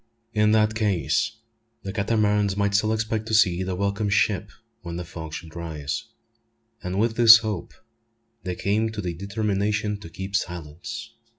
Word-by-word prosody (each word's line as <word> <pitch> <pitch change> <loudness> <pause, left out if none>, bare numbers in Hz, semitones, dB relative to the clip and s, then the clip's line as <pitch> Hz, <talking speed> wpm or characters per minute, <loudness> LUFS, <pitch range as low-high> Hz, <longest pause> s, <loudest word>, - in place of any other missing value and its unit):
In 105 0 +3
that 110 0 +3
case 105 -2 +1 0.5
the 95 - -5
Catamarans 105 -1 +1
might 100 0 +1
still 110 +2 +2
expect 110 0 -1
to 110 - +1
see 95 -5 +4
the 95 0 -2
welcome 100 +2 -1
ship 100 -1 +1 0.3
when 85 0 -6
the 90 0 -4
fog 80 -2 -8
should 80 0 -8
rise; 75 -4 -4 0.8
and 90 0 -3
with 110 +1 +1
this 115 -1 +10
hope 105 -6 -3 0.7
they 90 -2 -4
came 110 +4 0
to 110 - -6
the 90 -3 -3
determination 105 +2 -1
to 100 - -10
keep 95 +4 -6
silence. 90 +7 -4
100 Hz, 160 wpm, -25 LUFS, 90-110 Hz, 0.8 s, this